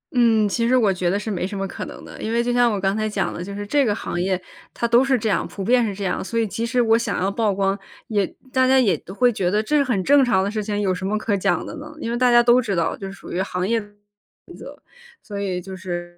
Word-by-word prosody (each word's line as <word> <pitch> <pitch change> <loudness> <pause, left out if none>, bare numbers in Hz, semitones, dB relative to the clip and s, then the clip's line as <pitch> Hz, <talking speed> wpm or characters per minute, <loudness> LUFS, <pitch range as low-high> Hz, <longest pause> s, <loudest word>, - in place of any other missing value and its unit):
嗯， 225 -3 +4
其 230 +4 0
实 255 +2 +4
我 215 -6 +3
觉 180 -1 -1
得 195 - +1
是 215 +1 -4
没 180 -1 -2
什 200 0 -6
么 195 - -2
可 - - -6
能 - - -10
的， - - -11
因 220 - -3
为 235 +1 +1
就 245 0 0
像 245 -1 +4
我 205 - -1
刚 195 +1 0
才 215 0 -1
讲 200 -2 -2
的 170 - -5
就 200 +2 -7
是 205 0 -5
这 285 +6 +2
个 210 -4 +1
行 175 - -4
业 185 0 0 0.3
它 235 - -2
都 235 +2 +5
是 270 -1 +2
这 220 - -2
样， 205 - +1
普 195 - -7
遍 245 +4 +3
是 210 - -1
这 200 - -6
样。 190 - -1
所 230 +4 -2
以 225 - +2
即 225 +3 -3
使 250 +1 0
我 225 -2 +4
想 235 - -1
要 195 +2 0
曝 215 0 +1
光， 195 0 0 0.3
也 205 -3 +1 0.3
大 260 0 +3
家 265 +1 +5
也 205 -9 +3
都 185 - -12
会 245 +2 +3
觉 180 -3 0
得 210 +3 +1
这 300 - 0
是 285 - +4
很 240 -8 0
正 280 +5 +5
常 210 -7 +2
的 200 - -2
事 215 -1 -2
情， 205 0 -2
有 195 -2 +1
什 185 +1 -6
么 210 +2 0
可 215 -1 -1
讲 190 - 0
的 - - -7
呢？ 305 +1 -9
因 230 - -3
为 240 - -1
大 250 0 +3
家 240 0 +6
都 240 +1 +5
知 205 -4 -2
道 170 -1 0
这 195 -1 -7
属 - - -11
于 180 - -1
行 180 -1 -2
业 230 +1 +2
规 205 - -14
则， 205 - -27 1.3
所 205 -2 -6
以 185 -3 -2
就 190 +1 -8
是。 175 -2 -6
210 Hz, 325 characters per minute, -22 LUFS, 195-235 Hz, 1.3 s, 家